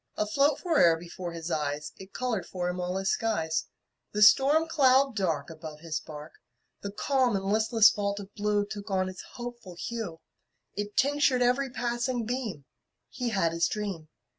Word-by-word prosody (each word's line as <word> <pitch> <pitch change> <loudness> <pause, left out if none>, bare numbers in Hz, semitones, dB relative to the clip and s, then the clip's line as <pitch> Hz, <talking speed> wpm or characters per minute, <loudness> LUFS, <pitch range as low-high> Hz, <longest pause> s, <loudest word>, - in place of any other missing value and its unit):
Afloat 275 +7 +2
fore'er 290 - +4
before 175 +1 -7
his 165 0 -5
eyes, 150 0 -2
It 190 0 -12
colored 230 -8 -2
for 180 -1 -3
him 180 0 -3
all 180 +1 -2
his 195 0 0
skies: 160 -8 -1 0.5
The 210 0 +4
storm 285 +8 +6
cloud 270 -4 +4
dark 165 -7 -1
Above 155 -1 -9
his 160 -2 -3
bark, 150 0 -10 0.5
The 200 - -5
calm 255 +1 +1
and 195 0 -2
listless 220 +2 +5
vault 200 0 -2
of 200 0 -10
blue 205 -1 0
Took 205 0 -7
on 185 -1 0
its 185 - -8
hopeful 240 -7 -8
hue, 190 -3 -5 0.5
It 205 +1 -5
tinctured 280 -2 +3
every 255 +3 +2
passing 240 0 -2
beam 225 - -4 0.5
He 250 -2 -2
had 190 -7 +1
his 170 0 +1
dream. 195 -7 -4
205 Hz, 165 wpm, -28 LUFS, 175-245 Hz, 0.5 s, storm